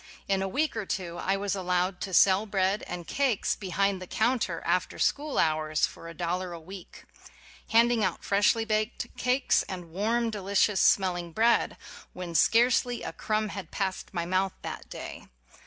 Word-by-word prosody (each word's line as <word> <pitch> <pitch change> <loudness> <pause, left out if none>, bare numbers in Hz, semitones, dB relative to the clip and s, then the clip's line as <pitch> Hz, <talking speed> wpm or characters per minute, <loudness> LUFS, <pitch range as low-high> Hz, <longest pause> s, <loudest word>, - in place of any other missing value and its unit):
In 195 -1 +1
a 195 - -1
week 295 +10 -1
or 215 -4 -4
two 175 -3 -4
I 195 +1 0
was 200 -1 -2
allowed 180 0 -1
to 195 - -4
sell 190 +3 +5
bread 195 0 0
and 175 -1 -6
cakes 265 -3 0
behind 195 0 -1
the 185 - -7
counter 240 +4 0
after - - 0
school 295 0 0
hours 155 -1 +2
for 165 - -10
a 165 - -8
dollar 180 +2 -2
a 170 - -7
week 185 +2 -11 0.6
ŌĆö - - -16
handing 230 -1 +4
out 185 -3 -1
freshly 205 +3 +2
baked 215 +2 -2
cakes 250 +2 +2
and 180 -3 -7
warm, 225 +5 0
de 210 -2 -5
licious 200 +1 +2
smelling 175 -3 +2
bread, 230 +4 +2 0.4
when 180 -2 -6
scarcely 240 +7 +3
a - - -5
crumb 215 0 -1
had 190 -4 -7
passed 190 -2 -3
my 170 -4 -2
mouth 185 +2 0
that - - -7
day! - - -8
195 Hz, 175 wpm, -28 LUFS, 180-220 Hz, 0.6 s, sell